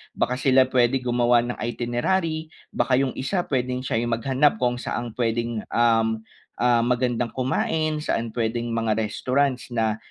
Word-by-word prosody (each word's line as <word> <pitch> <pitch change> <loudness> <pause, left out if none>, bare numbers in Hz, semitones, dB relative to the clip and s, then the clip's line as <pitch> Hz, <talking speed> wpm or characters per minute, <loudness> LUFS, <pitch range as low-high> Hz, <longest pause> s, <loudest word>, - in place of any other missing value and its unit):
Baka 125 +1 -1
sila 130 0 +5
pwede 125 +1 +2
gumawa 120 -1 +3
ng 120 0 -5
itinerary. 155 +8 -1 0.2
Baka 130 - +1
'yong 130 0 +1
isa 175 +7 -1
puwedeng 125 -1 -2
siya 115 -3 0
yung 120 0 -1
maghanap 135 +3 +2
kung 125 0 +1
saang 120 -2 -4
pwedeng, 115 -1 -1
um, 115 -1 +2 0.4
ah, 120 -1 +3
magandang 120 -1 0
kumain, 155 +4 0
saan 115 -6 -1
pwedeng 120 0 -1
mga 115 -1 0
restaurants 130 +5 -1
na, 110 -2 0
120 Hz, 150 wpm, -24 LUFS, 115-130 Hz, 0.4 s, sila